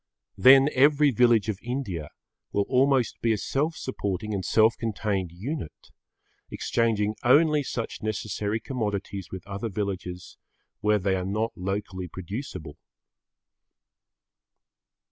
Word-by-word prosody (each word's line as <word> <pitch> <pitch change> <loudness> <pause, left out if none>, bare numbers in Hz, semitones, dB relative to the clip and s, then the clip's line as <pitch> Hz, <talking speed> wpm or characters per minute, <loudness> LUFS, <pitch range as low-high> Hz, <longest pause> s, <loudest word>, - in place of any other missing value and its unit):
Then 135 +1 +8
every 145 +2 +5
village 115 -3 +4
of 105 -3 -2
India 115 - -4 0.4
will 100 - +1
almost 130 -2 +2
be 115 -1 +2
a - - -1
self 150 +9 -1
supporting 105 - -3
and 95 -2 -2
self 110 +3 +4
contained 100 -5 -2
unit, 105 - -6 0.6
exchanging 110 -2 0
only 150 +4 +5
such 120 -4 -4
necessary 110 0 -2
commodities 105 -6 -4
with 95 -1 -7
other 100 +3 -4
villages 90 -3 -5 0.4
where 105 0 +3
they 95 -1 0
are 90 - -2
not 105 +4 -1
locally 95 -1 -4
producible. 90 - -7
105 Hz, 115 wpm, -26 LUFS, 95-125 Hz, 0.6 s, Then